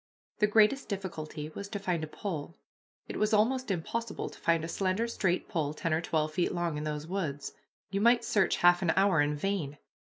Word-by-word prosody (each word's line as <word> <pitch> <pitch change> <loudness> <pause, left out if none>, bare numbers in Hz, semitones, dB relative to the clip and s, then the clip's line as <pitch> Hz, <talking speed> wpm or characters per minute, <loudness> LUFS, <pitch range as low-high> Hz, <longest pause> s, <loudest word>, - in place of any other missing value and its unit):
The 210 - +4
greatest 215 +6 +3
difficulty 155 -6 -5
was 200 +5 -7
to 205 - -3
find 180 -5 -1
a - - -3
pole. 165 -1 -5 0.5
It - - -5
was 215 +1 +2
almost 255 +4 +2
impossible 210 +5 -3
to - - -14
find 165 -1 +2
a - - -3
slender, 190 +6 0
straight 185 -6 0
pole 155 -6 -2
ten 165 +1 -1
or 160 - +1
twelve 155 -2 -1
feet 175 - +1
long 170 -2 -1
in 150 +1 -3
those 150 0 -3
woods. 160 -6 -3 0.4
You 200 0 0
might 235 +1 +4
search 210 -6 +2
half 175 0 +6
an 175 -3 +2
hour 195 -5 +4
in 145 0 +1
vain. 150 -4 -2
180 Hz, 200 wpm, -30 LUFS, 155-210 Hz, 0.5 s, half